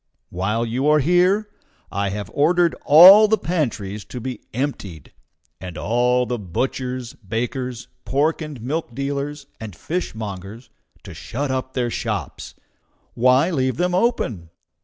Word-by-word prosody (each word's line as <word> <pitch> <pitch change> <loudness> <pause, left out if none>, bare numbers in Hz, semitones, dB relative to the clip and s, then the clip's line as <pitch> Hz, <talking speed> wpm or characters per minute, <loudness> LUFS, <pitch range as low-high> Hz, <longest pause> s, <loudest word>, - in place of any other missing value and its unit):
While 105 +6 -1
you 125 +5 -1
are 150 0 +5
here, 180 +7 +2 0.4
I 100 0 -1
have 100 +1 -5
ordered 170 +3 +3
all 185 +8 +9
the 220 +1 +2
pantries 110 - -3
to 125 - -8
be 125 -1 -6
emptied, 105 - -5 0.5
and 90 -1 -8
all 125 +4 +1
the 120 0 -3
butchers, 125 +5 -3
bakers, 120 +4 -4 0.2
pork 150 +5 0
and 150 -4 -7
milk 140 -2 -3
dealers, 140 +1 -4
and 110 -5 -8
fishmongers 110 - -6 0.3
to - - -10
shut 140 +3 -4
up 130 0 -3
their 120 -2 -1
shops. - - -4 0.6
Why 130 +8 +3
leave 130 -5 0
them 180 +1 0
open? 180 - 0
130 Hz, 135 wpm, -21 LUFS, 110-150 Hz, 0.6 s, all